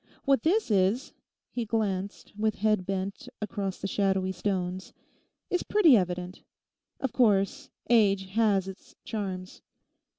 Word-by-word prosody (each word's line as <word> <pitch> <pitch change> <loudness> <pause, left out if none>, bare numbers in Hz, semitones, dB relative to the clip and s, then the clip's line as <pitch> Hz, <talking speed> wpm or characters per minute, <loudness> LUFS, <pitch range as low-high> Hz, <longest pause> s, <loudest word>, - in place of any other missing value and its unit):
What 275 -4 +3
this 365 - +1
is'—he 215 +4 -1
glanced, 205 -3 -2
with 215 0 0
head 215 -3 +1
bent, 195 0 -3
across 200 -2 -3
the - - -4
shadowy 190 -1 +1
stones, 185 -1 -3 0.6
'is 360 - +1
pretty 360 -10 +5
evident. 180 -2 -1 0.6
Of 265 - -2
course, 235 +4 +2 0.2
age 200 -5 +3
has 200 -2 +2
its 190 0 -11
charms. 190 -4 -5
200 Hz, 120 wpm, -28 LUFS, 190-225 Hz, 0.6 s, pretty